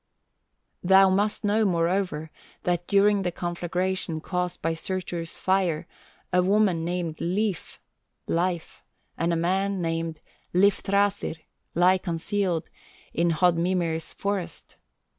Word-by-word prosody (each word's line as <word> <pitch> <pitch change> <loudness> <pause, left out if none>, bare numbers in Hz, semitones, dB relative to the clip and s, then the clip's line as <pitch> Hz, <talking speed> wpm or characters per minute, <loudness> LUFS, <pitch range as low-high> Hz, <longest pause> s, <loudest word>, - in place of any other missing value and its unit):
"Thou 190 +1 +6
must 205 +2 +1
know, 210 +2 +2
moreover, 170 -3 0 0.3
that 175 -1 0
during 200 0 +4
the 180 -2 -1
conflagration 175 0 -2
caused 180 +1 -3
by 165 +1 0
Surtur's 170 -1 -4
fire, 180 -4 +1 0.5
a 180 - +5
woman 190 -3 +2
named 170 -2 -3
Lif 190 +1 -2 0.5
(Life), 175 -1 -1 0.3
and 170 +1 0
a - - +2
man 190 +4 0
named 165 -1 -2 0.4
Lifthrasir, 200 0 +2 0.4
lie 180 +2 +5
concealed 175 0 -2 0.4
in 170 +1 +2
Hodmimir's 170 0 +1
forest. 200 -3 -4
180 Hz, 105 wpm, -26 LUFS, 170-195 Hz, 0.5 s, Thou